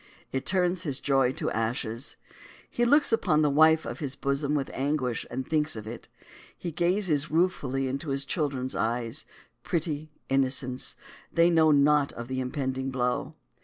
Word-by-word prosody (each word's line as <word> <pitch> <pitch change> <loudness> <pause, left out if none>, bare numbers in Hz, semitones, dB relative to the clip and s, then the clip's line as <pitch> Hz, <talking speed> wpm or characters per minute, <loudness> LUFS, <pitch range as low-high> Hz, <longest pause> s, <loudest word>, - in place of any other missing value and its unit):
It 135 0 -3
turns 180 -1 +2
his 145 -7 -1
joy 135 -2 +2
to - - -2
ashes. 115 +2 -2 0.6
He 240 - +1
looks 285 0 +4
upon 155 -9 +3
the 150 - +3
wife 160 +2 +5
of - - -5
his 140 -4 -3
bosom 140 +1 -1
with 140 -2 -2
anguish 135 -3 -1
as 120 - -7
he 130 - -1
thinks 155 +1 +1
of 110 -1 -7
it. 115 +2 -8 0.5
He 175 - -5
gazes 170 -3 +1
ruefully 145 -6 0
into 140 +4 -3
his 135 0 0
children's 135 -5 -2
eyes; 115 +5 -2 0.4
pretty 155 -2 -2 0.2
innocents, 130 -1 +1 0.4
they 170 +1 +4
know 160 -2 +5
naught 145 0 +4
of 120 +1 -7
the 130 0 -2
impending 130 0 -2
blow. 125 -1 -1
140 Hz, 165 wpm, -27 LUFS, 130-160 Hz, 0.6 s, wife